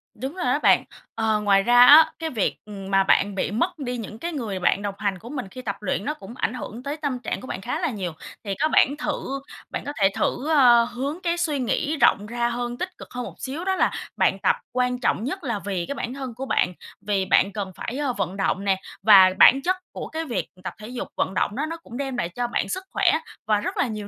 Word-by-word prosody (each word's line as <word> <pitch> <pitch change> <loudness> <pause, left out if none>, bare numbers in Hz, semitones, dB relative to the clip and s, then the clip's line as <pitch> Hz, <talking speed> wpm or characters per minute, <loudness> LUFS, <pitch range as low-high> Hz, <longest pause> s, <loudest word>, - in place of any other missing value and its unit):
Đúng 265 - -5
rồi 360 - -3
đó - - +2
bạn. - - +5 0.3
Ờ, 220 -1 +1
ngoài 195 -1 +4
ra 245 +2 +7
á, 305 +4 +9
cái 325 -1 -2
việc, 220 -8 -1
ừm, 195 -2 -8
mà 195 0 +4
bạn 200 +1 +2
bị 195 - -1
mất 310 - -1
đi 250 -2 -3
những 220 0 -7
cái 340 +4 -3
người 215 -9 -3
bạn 195 +2 +2
đồng 200 -1 -3
hành 195 -3 -2
của 235 - -11
mình 260 -8 -5
khi 255 - -8
tập 200 -5 -3
luyện 195 0 -2
nó 300 - -1
cũng 230 -2 -11
ảnh 240 - -1
hưởng 245 0 -7
tới 285 +2 -4
tâm 285 -5 -2
trạng 245 - -4
của 260 - -9
bạn - - -5
khá 250 +9 -3
là 335 - 0
nhiều. 190 -8 -4 0.3
Thì 200 -2 -3
có 310 - +3
bản 285 -2 +3
thử 275 -2 -3 0.3
bạn - - -4
có 285 - -4
thể 195 -1 +5
thử, 295 +5 -1
ơ, 245 -6 +6
hướng 275 +9 -4
cái 340 0 0
suy 310 -5 0
nghĩ 295 +5 -1
rộng 205 -6 +4
ra 240 +2 -1
hơn, 240 0 -3
tích 365 0 -5
cực - - -10
hơn 250 0 -4
một - - -9
xíu. 305 +8 -5
Đó 380 0 +1
là - - +2 0.3
bạn - - +2
tập 485 - +3 0.2
quan 250 0 0
trọng 225 - 0
nhất 350 +8 -4
là 235 -6 -2
vì 185 -4 -2
cái 280 - -5
bản 245 - -4
thân 265 -3 -6
của 265 +2 -5
bạn, 180 -7 +1 0.3
vì 195 -2 +1
bạn 195 +1 +3
cần 195 -2 -4
phải 255 +10 -5 0.2
vận 195 0 -2
động 195 0 0
nè, 190 -1 +1 0.2
và 195 -3 +8
bản 270 +2 +7
chất 370 +4 +1 0.2
của - - -6
cái 320 +1 -4
việc 195 - -2 0.2
tập - - -5
thể 215 +1 -10
dục, 245 0 -5
vận 190 - 0
động 205 - 0
đó 295 +4 -1
nó 330 +1 -5
cũng 245 -7 -10
đem 270 -2 -3
lại 170 - -1
cho 245 +6 -3
bạn 240 - -2
sức 375 0 -3
khỏe 390 -3 +3 0.4
và 210 -1 +3
rất - - -4
là - - +2
nhiều 210 -2 -5
245 Hz, 260 wpm, -24 LUFS, 205-285 Hz, 0.4 s, á